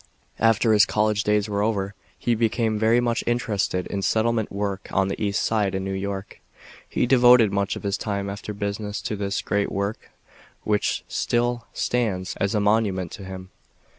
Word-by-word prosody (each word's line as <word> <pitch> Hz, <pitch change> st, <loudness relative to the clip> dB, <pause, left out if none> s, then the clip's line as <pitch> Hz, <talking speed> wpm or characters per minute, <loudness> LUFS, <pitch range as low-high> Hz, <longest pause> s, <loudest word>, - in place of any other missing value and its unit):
After 115 Hz, 0 st, +4 dB
his 105 Hz, -1 st, +6 dB
college 105 Hz, -1 st, +1 dB
days 105 Hz, 0 st, +2 dB
were 100 Hz, -1 st, -1 dB
over, 100 Hz, -2 st, -1 dB, 0.2 s
he 120 Hz, -, 0 dB
became 110 Hz, -1 st, +1 dB
very 110 Hz, +2 st, +4 dB
much 120 Hz, 0 st, 0 dB
interested 105 Hz, -6 st, 0 dB
in 100 Hz, -, -3 dB
settlement 110 Hz, +2 st, +1 dB
work 100 Hz, -1 st, -3 dB
on 95 Hz, 0 st, +1 dB
the 100 Hz, -, -3 dB
East 100 Hz, 0 st, 0 dB
Side 105 Hz, -4 st, +1 dB
in 95 Hz, -, -2 dB
New 95 Hz, 0 st, -3 dB
York. 95 Hz, 0 st, -5 dB, 0.5 s
He -, -, +1 dB
devoted 125 Hz, -4 st, +6 dB
much 100 Hz, 0 st, 0 dB
of -, -, -8 dB
his 100 Hz, -1 st, -1 dB
time 100 Hz, -2 st, -2 dB
after 100 Hz, +1 st, -5 dB
business 105 Hz, 0 st, -3 dB
to 110 Hz, -, -2 dB
this 100 Hz, -1 st, -2 dB
great 100 Hz, -1 st, 0 dB
work 100 Hz, +2 st, -3 dB, 0.5 s
which 105 Hz, -1 st, 0 dB
still 120 Hz, 0 st, -1 dB
stands 95 Hz, -7 st, -1 dB
as 100 Hz, +2 st, 0 dB
a -, -, +3 dB
monument 100 Hz, -4 st, +1 dB
to 100 Hz, -, -8 dB
him. 95 Hz, 0 st, -8 dB
105 Hz, 175 wpm, -24 LUFS, 100-110 Hz, 0.5 s, his